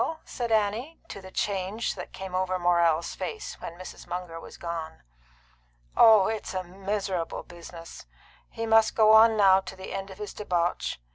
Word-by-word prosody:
said 235 -2 -4
Annie, 220 +8 0
to 200 - -8
the 190 - -11
change 200 +3 -2
which - - -8
came 190 -1 -8
over 185 0 0
Morrell's 170 -2 +2
face 435 - -6
when 170 - -7
Mrs. 185 - -10
Munger 175 -2 -5
was - - -12
gone. 165 - -6 0.9
"Oh, 220 -4 +7
it's 220 -2 -3
a 185 - -1
miserable 190 -1 -3
business! 170 - -11 0.4
He 230 - -5
must 225 0 +4
go 215 -1 +6
on 220 0 +7
now 190 -2 +6
to 190 - -9
the 190 0 -8
end 195 0 -5
of 190 - -11
his 210 0 -6
debauch. 175 -4 -1
190 Hz, 165 wpm, -27 LUFS, 175-215 Hz, 0.9 s, Oh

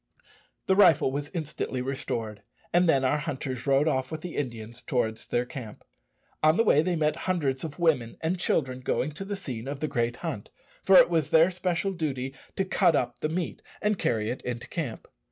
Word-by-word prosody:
The 190 - +3
rifle 170 -9 +5
was 145 +2 -3
instantly 150 -5 -3
restored, 120 -5 -3 0.3
and 175 0 +4
then 135 -4 +3
our 145 +4 +2
hunters 135 -4 -4
rode 140 +2 +4
off 130 -4 0
with 160 -1 -5
the 175 0 -6
Indians 115 -3 -4
towards 110 -3 -2
their 120 +1 0
camp. 125 -6 -9 0.6
On 155 +1 +4
the 230 - +5
way 150 -9 +5
they 180 +2 0
met 155 -1 +1
hundreds 145 -8 0
of 155 -3 -6
women 150 -10 +1
and 170 +3 -1
children 130 -7 0
going 130 +3 -1
to 150 - -7
the 200 +1 -3
scene 130 - -6
of 140 0 -4
the 155 - -1
great 120 -4 -1
hunt, 135 -11 -4 0.3
for 190 -1 +6
it - - +7
was 160 -4 +1
their 165 +3 +5
special 180 +1 -1
duty 135 -6 -3 0.2
to 195 - 0
cut 170 -3 +3
up 120 -3 -1
the 155 - -1
meat 170 +1 -3 0.2
and 210 -1 0
carry 110 -1 0
it 125 - -5
into 120 0 -5
camp. 145 -9 -5
145 Hz, 200 wpm, -27 LUFS, 125-165 Hz, 0.6 s, it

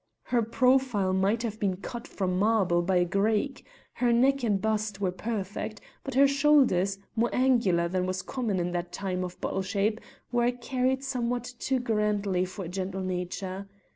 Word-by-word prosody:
Her 245 -2 +1
profile 235 -4 +2
might 200 +5 +1
have 220 -2 -4
been 190 -3 0
cut 235 +5 -7
from 185 -2 -1
marble 200 -5 +3
by 185 +2 0
a 175 0 +4
Greek; 215 +8 0 0.3
her 245 -1 +1
neck 270 +4 +3
and 205 -4 +2
bust 215 -1 -1
were 190 -2 0
perfect, 210 +1 -4 0.2
but 270 -2 -5
her 275 +1 +7
shoulders, 275 -10 +3 0.2
more 235 +1 +2
angular 230 -10 +3
than 180 +1 -1
was 185 0 -2
common 230 -8 -2
in 175 0 -1
that 175 0 -3
time 185 -2 -3
of 180 -1 -7
bottle 195 - -1
shape, 205 +3 0 0.3
were 240 0 +2
carried 255 +2 -1
somewhat 245 -3 -1 0.2
too 265 -1 0
grandly 210 -5 0
for 190 +1 -7
a - - -5
gentle 190 +1 -3
nature. 185 +1 -4
210 Hz, 170 wpm, -28 LUFS, 185-245 Hz, 0.3 s, her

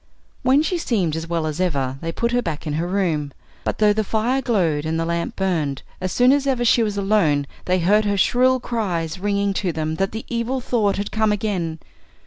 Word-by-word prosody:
When 270 +4 +4
she 350 +2 -1
seemed 190 - 0
as 160 +1 -4
well 165 -1 -1
as 155 +3 -2
ever 135 -7 -1
they 165 - -3
put 235 +7 -1
her 245 0 +2
back 160 -8 -4
in 150 - -2
her 165 +3 -1
room. 170 -7 0 0.3
But - - -2
though 210 -1 +4
the 215 +1 0
fire 230 +6 0
glowed 175 - +1
and 160 +1 -1
the 165 - 0
lamp 170 +7 -2
burned, 160 -8 -1 0.2
as 185 0 -2
soon 245 +1 +4
as 280 0 +2
ever 250 -3 +1
she 235 - +4
was 210 -2 -1
alone 195 -8 +2 0.2
they 185 0 +2
heard 205 +5 +3
her 205 -1 +1
shrill 255 +6 +3
cries 185 -9 -2
ringing 200 0 0
to 190 -2 -1
them 160 0 -3
that 195 0 0
the 220 +1 -6
Evil 235 +2 -1
Thought 225 -5 0
had 200 0 -3
come 220 -1 +2
again. 190 -6 -2
195 Hz, 220 wpm, -22 LUFS, 165-225 Hz, 0.3 s, When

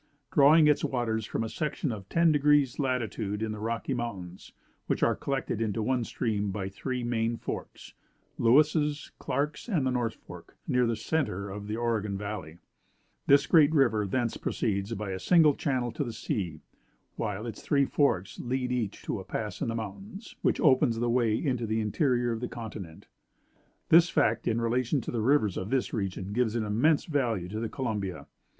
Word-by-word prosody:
Drawing 150 +3 +6
its 150 - +3
waters 110 -4 -1
from - - -2
a - - -2
section 150 +2 -2
of 100 -3 -7
ten 170 -1 +4
degrees 145 -3 +4
of - - -17
latitude 115 -6 -1
in 110 - -2
the 105 - -5
Rocky 115 +4 -2
Mountains, 100 -8 -6 0.4
which - - 0
are - - +3
collected 135 -5 -2
into 110 0 -1
one 125 +1 +1
stream 105 -5 -1
by 95 -1 -3
three 125 +5 -4
main 115 -1 0
forks - - -7 0.5
(Lewis's, 150 +4 +3
Clark's, 150 +10 -2
and 165 - +1
the 130 - +1
North 120 -3 -1
Fork), - - -13
near 125 -1 +2
the 115 - 0
centre 100 - -2
of 105 +1 -7
the 105 - -2
Oregon 110 -4 -1
valley, 95 -6 -6 0.7
this 140 0 +6
great 155 -3 +5
river 110 -7 +3
thence 120 +3 -1
proceeds 100 +1 -2
by 105 -2 -4
a 95 - -4
single 160 - +5
channel 130 -4 -1
to 130 - -2
the 120 -4 -5
sea, 85 -10 -3 0.5
while 105 0 -3
its 115 -3 -6
three 140 -2 +2
forks 110 -10 0
lead 125 0 -2
each 120 -5 -2
to - - -3
a - - -7
pass - - -5
in - - 0
the 115 - -2
mountains, 195 - -7
which - - +1
opens 130 -5 +4
the 120 +1 0
way 115 -3 +2
into 125 -2 -1
the 110 +1 0
interior 120 +2 +1
of 115 - -2
the 125 - -3
continent. 105 -9 -8 0.8
This 170 +1 +7
fact 115 -6 +1
in 115 0 +1
relation 120 +4 +1
to - - -5
the 115 - -1
rivers 110 -5 +2
of 95 - -4
this 130 0 0
region 95 -2 -3
gives 120 -1 +1
an 115 - 0
immense 120 +9 +2
value 120 - -1
to 110 +2 -4
the 115 -1 -3
Columbia. 105 -8 -3
115 Hz, 185 wpm, -28 LUFS, 105-135 Hz, 0.8 s, This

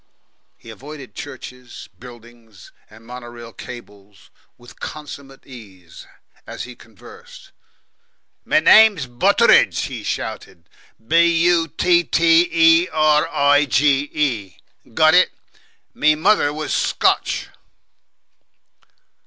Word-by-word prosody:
He 115 - -14
avoided 140 +4 -12
churches, 125 -5 -11
buildings, 115 -5 -16 0.2
and 110 +1 -18
mono 125 0 -10
rail 120 -1 -12
cables 105 -5 -14 0.3
with 120 0 -18
consummate 140 -2 -10
ease 95 -10 -15 0.4
as - - -8
he 125 0 -11
conversed. 110 -5 -17 0.9
"Me - - +1
name's 205 -3 +5
Butteridge," 120 -1 +2
he - - -6
shouted; 85 - -7 0.4
"B 170 +5 +3 0.2
U 170 -2 +2
T 175 0 +1
T 165 +1 +2
E 165 +1 +3
R 155 0 +1
I 145 -1 +2
D - - -17
G 140 +3 +1
E. 120 -11 -5
Got 155 0 +4
it? 180 +1 +3 0.6
Me 155 0 +2
mother 165 -2 +1
was 150 0 -5
Scotch." - - -1
140 Hz, 110 wpm, -19 LUFS, 120-155 Hz, 0.9 s, name's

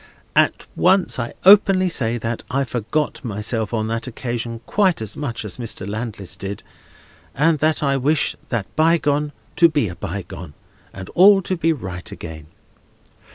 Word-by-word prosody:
At - - +2
once 190 -7 +3
I 115 - -4
openly 195 -1 +7
say 120 -9 0
that 115 0 -3
I 135 +2 +1
forgot 125 +6 -2
myself 110 -1 -2
on 110 -2 -1
that 115 +2 -3
occasion 120 -1 -4
quite 190 - +2
as 110 -2 -5
much 120 -7 -4
as 100 - -7
Mr. 115 -5 -5
Landless 105 -3 -5
did, 100 +1 -6 0.7
and 155 +2 +3
that 155 +1 +1
I 140 -1 +2
wish 145 +3 +1
that 115 -5 -1
bygone 150 -2 +2 0.3
to 170 -1 +7
be 145 - 0
a 85 - -7
bygone, 90 -4 -7 0.4
and 95 -1 -9
all 195 +1 +6
to 185 - -1
be 165 -1 +1
right 95 - -5
again. 80 -5 -9
120 Hz, 155 wpm, -21 LUFS, 105-155 Hz, 0.7 s, openly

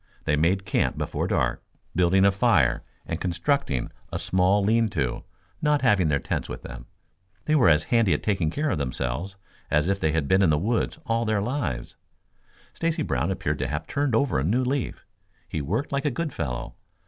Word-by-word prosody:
They 75 - +1
made 90 +6 +1
camp - - 0
before - - -2
dark, - - 0 0.3
building 90 +2 +4
a 100 - +6
fire 95 - +3 0.2
and 85 - -4
constructing 85 - 0 0.2
a - - -2
small 95 +2 +2
lean 115 +2 +3
to, 70 -10 -2 0.4
not 150 -2 +2
having 105 -8 +4
their 75 -2 +2
tents - - -3
with - - -7
them. 60 -1 -9 0.6
They 155 - +1
were 130 - +5
as 75 -1 +4
handy 115 -5 +4
at - - -5
taking 95 -7 +1
care 150 - -1
of - - -1
themselves 70 +7 -3 0.3
as 75 +4 +2
if 100 0 +1
they 80 - +1
had 80 -3 0
been 95 +5 +4
in 95 - +4
the 75 - +3
woods 110 +9 0
all 115 0 +1
of 115 - -2
their 110 -1 +2
lives. 100 - -3 0.8
Stacy 165 -1 -1
Brown 70 +4 -1
appeared 95 -2 -2
to - - -1
have 75 +4 -3
turned 140 -4 0
over 125 - +2
a - - -1
new 115 - +2
leaf. 130 0 -2 0.4
He 80 - -3
worked 105 - -2
like 140 +1 -1
a - - +3
good 155 +1 -3
fellow. 60 -3 -4
95 Hz, 200 wpm, -25 LUFS, 75-120 Hz, 0.8 s, a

